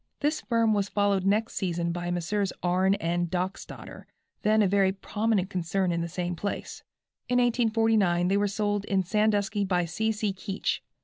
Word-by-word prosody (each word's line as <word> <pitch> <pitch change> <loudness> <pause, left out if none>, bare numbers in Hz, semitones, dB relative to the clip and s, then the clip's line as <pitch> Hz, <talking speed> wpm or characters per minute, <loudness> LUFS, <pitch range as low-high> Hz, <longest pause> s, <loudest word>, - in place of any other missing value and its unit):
This 300 +2 0
firm 230 -2 +2
was 200 -1 0
followed 200 -2 +1
next 215 +3 +1
season 170 -3 -1
by 175 0 -3
Messrs. 180 +3 -1
R. 180 +2 +2
& - - +2
N. 175 +1 0
Dockstadter, 185 +2 -5 0.4
then 215 +1 +3
a - - +3
very 195 0 +3
prominent 200 0 -1
concern 180 +1 0
in 170 0 -1
the 170 - -3
same 175 +1 -3
place. 200 +4 -5 0.5
In 250 - +2
1849 225 -7 +2
they 195 - +2
were 205 0 +2
sold 205 0 -1
in 195 -1 +1
Sandusky 210 +1 +1
by 180 -3 +1
C. 220 +7 -1
C. 210 -2 -1
Keech. 195 +1 -3
195 Hz, 175 wpm, -27 LUFS, 180-215 Hz, 0.5 s, then